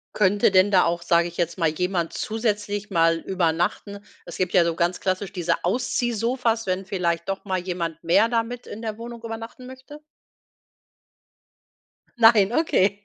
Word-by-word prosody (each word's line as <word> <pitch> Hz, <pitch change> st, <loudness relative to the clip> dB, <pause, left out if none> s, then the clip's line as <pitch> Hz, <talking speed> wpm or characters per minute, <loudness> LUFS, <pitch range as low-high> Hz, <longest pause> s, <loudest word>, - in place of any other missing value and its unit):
Könnte 205 Hz, 0 st, +3 dB
denn 190 Hz, +1 st, +4 dB
da 185 Hz, -2 st, +5 dB
auch, 170 Hz, 0 st, -1 dB
sage 170 Hz, 0 st, +2 dB
ich 170 Hz, -, -10 dB
jetzt 170 Hz, 0 st, -2 dB
mal, 165 Hz, -3 st, +2 dB
jemand 175 Hz, +1 st, -1 dB
zusätzlich 210 Hz, -2 st, -2 dB
mal 165 Hz, -3 st, +3 dB
übernachten? 180 Hz, +4 st, -1 dB, 0.2 s
Es 175 Hz, -, -9 dB
gibt 180 Hz, -1 st, -1 dB
ja 180 Hz, -, +6 dB
so 170 Hz, -1 st, 0 dB
ganz 175 Hz, +2 st, -1 dB
klassisch 190 Hz, +1 st, -2 dB
diese 175 Hz, -3 st, -1 dB
Ausziehsofas, 235 Hz, +2 st, 0 dB
wenn 185 Hz, +1 st, -1 dB
vielleicht 170 Hz, -3 st, -2 dB
doch 195 Hz, 0 st, -3 dB
mal 190 Hz, -2 st, -2 dB
jemand 170 Hz, -3 st, -4 dB
mehr 175 Hz, +7 st, +3 dB
da 230 Hz, -1 st, +2 dB
mit 245 Hz, +1 st, -8 dB
in 220 Hz, -, -8 dB
der 220 Hz, -2 st, -4 dB
Wohnung 235 Hz, 0 st, -8 dB
übernachten 225 Hz, +2 st, -8 dB
möchte. 260 Hz, +3 st, -12 dB, 2.2 s
Nein, 225 Hz, -3 st, +6 dB
okay. 205 Hz, -, +1 dB
195 Hz, 160 wpm, -23 LUFS, 175-225 Hz, 2.2 s, ja